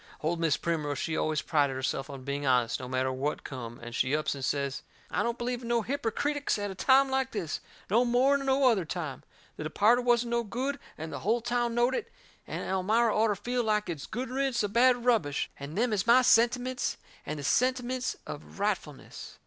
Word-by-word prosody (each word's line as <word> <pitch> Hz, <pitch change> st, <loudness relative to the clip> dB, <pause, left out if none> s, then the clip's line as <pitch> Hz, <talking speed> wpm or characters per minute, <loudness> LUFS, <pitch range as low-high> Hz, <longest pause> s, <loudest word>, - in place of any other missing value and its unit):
Old 165 Hz, +2 st, -1 dB
Mis' 165 Hz, -3 st, +2 dB
Primrose, 150 Hz, -4 st, -2 dB
she 160 Hz, +3 st, -2 dB
always 155 Hz, -1 st, 0 dB
prided 145 Hz, -4 st, +1 dB
herself 130 Hz, +2 st, -2 dB
on 135 Hz, -2 st, -8 dB
being 140 Hz, +1 st, -3 dB
honest, 125 Hz, -4 st, +2 dB
no 125 Hz, -, -6 dB
matter 130 Hz, +1 st, 0 dB
what 135 Hz, +3 st, -2 dB
come, 120 Hz, -3 st, -7 dB
and 120 Hz, 0 st, -7 dB
she 130 Hz, +4 st, +1 dB
ups 155 Hz, -, 0 dB
and 140 Hz, -2 st, -7 dB
says: 140 Hz, 0 st, -1 dB, 0.3 s
"I -, -, 0 dB
don't 235 Hz, 0 st, -1 dB
believe 245 Hz, 0 st, -3 dB
in 235 Hz, -, -7 dB
no 235 Hz, -1 st, +1 dB
hippercritics 285 Hz, +3 st, -1 dB
at 205 Hz, -1 st, -3 dB
a -, -, -5 dB
time 265 Hz, +7 st, +4 dB
like 265 Hz, 0 st, 0 dB
this, 180 Hz, -8 st, -3 dB, 0.3 s
no 230 Hz, +5 st, +3 dB
more'n 260 Hz, +3 st, +3 dB
no 270 Hz, 0 st, +3 dB
other 220 Hz, -7 st, +3 dB
time. 155 Hz, -4 st, -5 dB, 0.4 s
The -, -, -5 dB
departed 215 Hz, +10 st, +3 dB
wasn't 240 Hz, -1 st, +2 dB
no 235 Hz, 0 st, +1 dB
good, 260 Hz, +6 st, -3 dB, 0.2 s
and 160 Hz, +1 st, -6 dB
the -, -, -4 dB
hull 225 Hz, +4 st, +1 dB
town 240 Hz, 0 st, -1 dB
knowed 240 Hz, +2 st, +3 dB
it; -, -, -3 dB, 0.4 s
and -, -, -4 dB
Elmira 215 Hz, +5 st, +2 dB
orter 215 Hz, -1 st, +3 dB
feel 245 Hz, +4 st, -2 dB
like 210 Hz, -2 st, 0 dB
it's 155 Hz, -4 st, -6 dB
good 250 Hz, +2 st, -4 dB
riddance 265 Hz, -3 st, 0 dB
of 205 Hz, 0 st, -2 dB
bad 245 Hz, 0 st, +4 dB
rubbish 210 Hz, -, +1 dB
and 140 Hz, +4 st, -7 dB
them 235 Hz, 0 st, +2 dB
is 205 Hz, +1 st, 0 dB
my 250 Hz, +2 st, +7 dB
sentiments 245 Hz, +2 st, +2 dB, 0.3 s
and 155 Hz, -, -4 dB
the 145 Hz, -, -6 dB
sentiments 255 Hz, -, +1 dB
of 145 Hz, -, -9 dB
rightfulness." 190 Hz, -8 st, -4 dB
215 Hz, 205 wpm, -29 LUFS, 150-245 Hz, 0.4 s, my